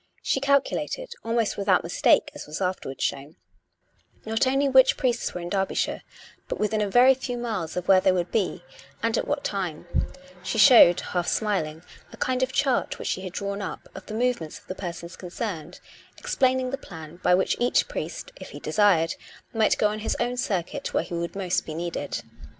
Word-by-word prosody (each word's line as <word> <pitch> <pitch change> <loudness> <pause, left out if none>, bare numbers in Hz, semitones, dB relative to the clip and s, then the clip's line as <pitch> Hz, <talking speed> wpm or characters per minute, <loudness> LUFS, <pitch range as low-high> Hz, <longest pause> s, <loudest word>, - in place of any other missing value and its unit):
She - - +1
calculated, 280 - 0
almost 230 -1 0
without 195 -2 +2
mistake, 170 - +3
as - - -9
was 150 +1 -5
afterwards 180 -8 -3
shown, 140 +3 -3 0.9
not 225 +4 +1
only 270 +2 +2
which 265 -1 +5
priests 245 -2 0
were 180 - -6
in 175 - -5
Derby 195 0 -1
shire, - - -1 0.5
but - - -4
within 210 0 0
a 205 - 0
very 250 +5 +7
few 250 -1 -4
miles 215 -9 -3
of 180 - -3
where 190 -1 +6
they 190 - +4
would 180 -1 -1
be 210 -4 -1 0.4
and 230 -1 +1
at - - -1
what 290 -1 -1
time: 180 -6 -3 0.6
she 185 +5 -3
showed, 205 -5 +8
half 175 -1 -2
smiling, 165 -7 -1 0.3
a - - -12
kind 255 0 0
of 260 0 +1
chart 270 -1 +1
which - - -4
she 185 - -1
had 185 -2 -7
drawn 200 +1 -3
up, 195 - -6
of 190 - -10
the 215 - -5
movements 235 -10 -1
of - - -18
the - - -5
persons 170 -2 -7
concerned, 180 -3 -6 0.4
explaining 260 -1 +1
the 275 - -3
plan 160 - -10
by 180 0 +3
which 190 - +1
each 245 - +2
priest - - -5
(if - - -10
he - - -9
desired) 185 -6 +3 0.4
might 220 -2 +3
go 210 - +3
on 215 +1 -4
his 215 - -2
own 245 +1 0
circuit 200 -9 -2
where - - +2
he - - -9
would 170 0 -3
be 195 - -6
most 180 -2 0
needed. 165 -2 -4
200 Hz, 195 wpm, -25 LUFS, 175-245 Hz, 0.9 s, showed